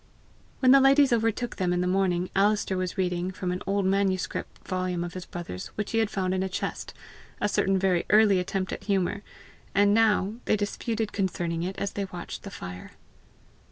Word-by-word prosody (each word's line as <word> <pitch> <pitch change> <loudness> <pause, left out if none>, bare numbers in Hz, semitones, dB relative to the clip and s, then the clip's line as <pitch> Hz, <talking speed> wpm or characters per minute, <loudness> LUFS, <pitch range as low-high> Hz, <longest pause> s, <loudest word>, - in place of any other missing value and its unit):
When 255 -1 +6
the 275 - +8
ladies 275 0 +5
overtook 225 +1 0
them 185 -2 0
in 180 0 +1
the - - 0
morning, 180 -1 +1
Alister 200 0 +2
was 185 +1 -3
reading, 180 -1 0
from 185 -1 -3
an 180 - -3
old 200 0 +1
manuscript 190 -1 -1
volume 185 -1 -1
of 175 -1 -6
his 185 -1 -7
brother's 165 - -6
which 210 -1 -3
he 225 - +1
had 220 -2 +1
found 185 -3 -1
in 190 - 0
a 190 - -1
chest, 185 - -4 0.4
a 205 - +1
certain 195 -1 +1
very 185 -2 +1
early 210 -3 +5
attempt 185 +1 -2
at - - -7
humour, 200 0 0 0.5
and 205 0 +5
now 215 -1 +3
they - - +3
disputed 215 +1 -2
concerning 175 -4 -1
it 185 +3 -4
as 200 - -2
they 200 - -3
watched 180 -2 -7
the 200 - -8
fire. 90 - -8
190 Hz, 190 wpm, -27 LUFS, 180-205 Hz, 0.5 s, the